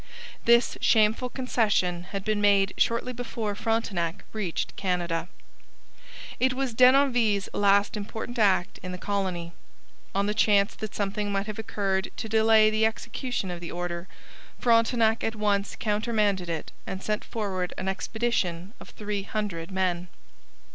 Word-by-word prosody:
This 235 +1 +4
shameful 220 +3 +3
concession 205 -9 0
had 195 +1 -5
been 215 -1 0
made 200 -2 +4
shortly 235 +2 +1
before 230 -3 -3
Frontenac 200 -6 -1
reached 200 -6 -3
Canada. 180 -3 -1 1.1
It 260 +1 +3
was 265 -2 -1
Denonville's 245 -5 +4
last 200 +1 +3
important 220 +3 -5
act 190 -4 +2
in 185 0 -6
the - - -5
colony. 185 -4 -2 0.6
On 200 +1 +2
the 210 - 0
chance 205 -2 +3
that 215 -2 -7
something 205 0 -2
might 200 0 -1
have 215 0 -6
occurred 195 -3 -1
to - - -4
delay 220 0 +4
execution 225 -2 -2
of 175 - -5
the 170 - -7
order, 175 0 -4 0.5
Frontenac 230 -1 +3
at 225 - -1
once 205 -1 0
countermanded 210 -4 0
it 165 -1 -4 0.2
and 190 0 -5
sent 210 0 -1
forward 190 -5 -3
an 190 - -4
expedition 190 -2 -2
of - - -12
three 205 -1 -4
hundred 195 -5 -4
men. 185 -2 -1
205 Hz, 140 wpm, -27 LUFS, 190-225 Hz, 1.1 s, This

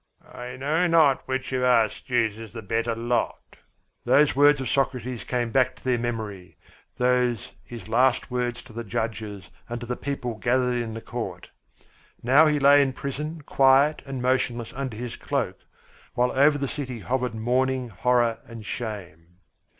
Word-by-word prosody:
"I 125 +1 -8
know 155 +7 +1
not 160 -5 +4
which 130 0 -3
of 130 - 0
us 120 -4 +3
chooses 115 -3 -1
the 115 -2 -7
better 115 +3 -1
lot!" 120 +1 -2 0.5
Those 145 -1 +4
words 145 +1 +5
of 130 - -3
Socrates 130 -3 -1
came 120 -2 -2
back 130 0 +2
to - - -18
their 125 -2 +1
memory, 110 -6 -5 0.4
those 125 -2 +1
his 115 -5 -10
last 125 +3 +2
words 125 -1 -2
to 125 - -15
the 115 +1 -5
judges 110 -3 -4 0.2
and 120 0 -4
to 120 - -7
the 125 +1 -3
people 130 -3 -4
gathered 125 0 +1
in 110 -1 -5
the 115 - -6
court. - - -6 0.7
Now 140 +6 +6
he 150 -1 +2
lay 145 0 +6
in 135 -2 +1
the - - -24
prison 150 +4 -5
quiet 140 +2 +4
and 135 -2 -4
motionless 125 -2 0
under 130 -4 -4
his 120 0 -6
cloak, - - -2 0.6
while 125 0 +2
over 145 +2 +4
the 140 -1 -2
city 130 -5 -5
hovered 125 -1 -2
mourning, 125 +2 0
horror, 120 +2 +1
and 115 -2 -10
shame. 90 -7 -7
125 Hz, 165 wpm, -25 LUFS, 115-135 Hz, 0.7 s, Now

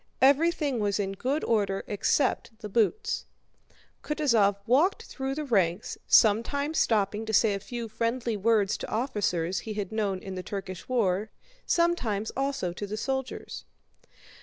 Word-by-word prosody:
Everything 285 -1 +3
was 205 -1 0
in 195 -1 -1
good 260 +10 -2
order 200 -4 +1
except 220 +2 0
the 210 - -6
boots. 425 - 0 0.8
Kutúzov 235 -10 +2
walked 310 - +3
through 270 0 -4
the 305 - -3
ranks, 190 -6 +1
sometimes 280 +8 +3
stopping 210 -1 +1
to 220 - -4
say 215 0 +4
a 200 - -2
few 235 +3 -6
friendly 230 +1 -1
words 210 -1 +2
to - - -6
officers 195 -8 -1
he 215 -2 -6
had 205 -2 -3
known 210 -3 -1
in 190 +1 -7
the 185 - -4
Turkish 190 0 -6
war, 215 -4 +1 0.4
sometimes 245 - +1
also 270 -10 -1
to 205 +3 -5
the 210 +2 -4
soldiers. 265 - -4
220 Hz, 145 wpm, -28 LUFS, 200-265 Hz, 0.8 s, say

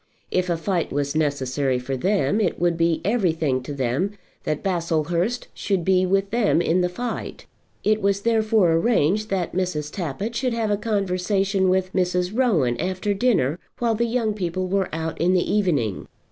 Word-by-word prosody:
If 185 0 0
a 170 - +1
fight 175 0 -1
was 140 0 -1
necessary 140 -3 0
for 130 +2 -3
them, 200 - +1
it 190 - 0
would 175 0 +2
be 165 -1 +1
everything 165 - +1
to 125 - -7
them 140 +8 -1 0.3
that 155 - -2
Baslehurst 170 +4 -1
should 190 -5 -1
be 185 -1 +3
with 195 +1 +1
them 230 -6 +2
in 175 +1 +2
the 180 - +1
fight. 235 +6 -5 0.4
It 215 0 +2
was 200 0 +1
therefore 220 -5 +3
arranged 210 +2 +2
that 185 -3 -1
Mrs. 165 -5 -2
Tappitt 195 +5 -3
should 250 0 0
have 225 -2 -1
a - - +3
conversation 195 -2 0
with 185 0 0
Mrs. 180 +1 0
Rowan 170 - +2
after 190 +3 -1
dinner, 195 - +1 0.2
while 235 -2 +1
the 235 +2 0
young 230 -2 0
people 185 -2 -2
were 190 0 0
out 160 0 -4
in 180 +2 +3
the 180 - +1
evening. 150 - 0
185 Hz, 175 wpm, -23 LUFS, 165-205 Hz, 0.4 s, be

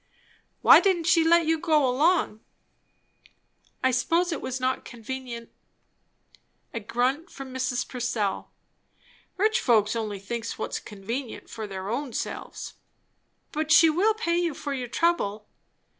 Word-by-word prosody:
"Why - - +9
didn't 375 -4 +2
she 330 -1 +4
let 335 0 +4
you 320 0 +1
go 305 -5 +3
along?" 285 -3 +2 1.4
"I 260 - +4
suppose 335 +8 +1
it 320 - -3
was 260 0 -4
not 255 0 -1
convenient." 240 0 -7 1.2
A 230 - -2
grunt 255 - -1
from 270 -2 -9
Mrs. 255 -1 -1
Purcell. 235 -6 -2 0.9
"Rich 435 +4 +2
folks 220 - +3
only 215 -3 -3
thinks 230 +4 -5
what's - - -3
convenient 230 +5 -6
for 220 -1 -5
their 190 -1 -6
own 245 +3 -3
selves!" - - -5 0.8
"But 310 +1 -2
she 330 -1 +7
will 410 +7 +2
pay 345 -6 0
you 340 -4 -1
for 285 - -4
your 255 -2 -3
trouble." 220 -9 0
260 Hz, 135 wpm, -26 LUFS, 230-330 Hz, 1.4 s, Why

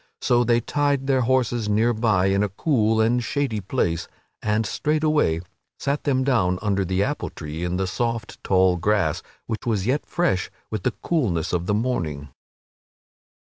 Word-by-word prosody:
So 120 0 +3
they 120 0 +2
tied 145 +1 0
their 135 -1 +2
horses 120 -3 +1
near 110 +3 +3
by 110 -5 +2
in 95 +1 +2
a 105 - +1
cool 110 - +1
and 120 +2 +2
shady 130 -6 -1
place 85 -3 -1 0.3
and 105 +1 +1
straightway 150 - +1 0.4
sat 140 +1 -2
them 130 -3 +2
down 100 -10 +2
under 100 -2 +1
the 95 +1 0
apple 145 +8 -2
tree 80 +1 -6
in 90 +1 -1
the 95 - 0
soft 115 +3 -3
tall 95 -1 +3
grass, 95 -2 +1 0.2
which 115 +1 -5
was 105 -5 0
yet 135 +5 0
fresh 170 - 0 0.2
with 110 -3 -2
the 120 - 0
coolness 100 - 0
of 90 0 -1
the 105 - +2
morning. 80 - -2
110 Hz, 165 wpm, -23 LUFS, 95-130 Hz, 0.4 s, So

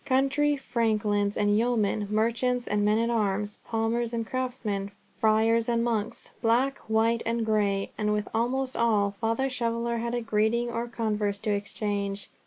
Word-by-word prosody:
Country 285 +2 +2
franklins 210 -5 0
and 205 0 +2
yeomen, 215 -3 +1
merchants 235 +3 +1
and 205 0 +1
men 210 +1 +3
at 230 +1 +1
arms, 210 -2 -1
palmers 230 +1 -1
and 230 -1 -2
craftsmen, 230 -6 -3 0.3
friars 225 +1 +3
and 235 -1 +2
monks, 230 -1 -2
black, 250 +4 +2
white, 225 +1 +2
and 230 0 -1
grey, 205 -2 +1
and 210 0 +1
with 210 0 -1
almost 255 +3 0
all, 215 -4 +2
Father 230 +4 +1
Shoveller 235 -2 -1
had 235 0 -2
greeting 225 +2 +1
or 235 +1 -2
converse 210 -3 -1
to 215 - -1
exchange. 200 -1 -2
225 Hz, 150 wpm, -27 LUFS, 210-235 Hz, 0.3 s, men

